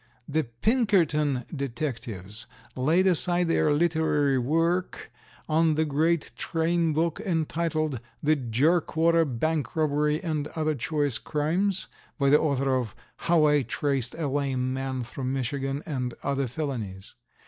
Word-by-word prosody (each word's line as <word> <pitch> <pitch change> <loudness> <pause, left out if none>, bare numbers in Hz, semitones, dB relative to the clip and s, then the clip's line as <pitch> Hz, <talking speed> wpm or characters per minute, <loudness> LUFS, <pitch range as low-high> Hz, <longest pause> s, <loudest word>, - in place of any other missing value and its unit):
The 155 0 0
Pinkerton 150 - +1
detectives 120 - -5 0.3
laid 160 +9 +2
aside 175 -1 +3
their 155 -2 +3
literary 150 -3 +2
work 165 +7 0 0.4
on 160 0 +3
the 160 +1 +1
great 155 +2 +1
train 165 0 0
book, 160 +2 0
entitled 160 - -1 0.2
"The 155 +1 +4
Jerkwater 160 +6 +2
Bank 145 +1 -2
Robbery 150 -1 +1
and 155 -4 -2
other 155 -1 0
Choice 145 -1 0
Crimes," 170 +6 0 0.3
by 140 -2 +2
the 150 - +6
author 135 -3 +1
of 120 -5 -2 0.2
"How 165 -2 +3
I 150 -1 +4
Traced 135 0 -1
a 160 -3 -2
Lame 130 -2 -1
Man 130 -1 -3
through 130 +3 -6
Michigan 135 +2 -2
and 125 -6 -3
other 140 -1 0
Felonies." 115 -9 -5
150 Hz, 125 wpm, -26 LUFS, 135-160 Hz, 0.4 s, the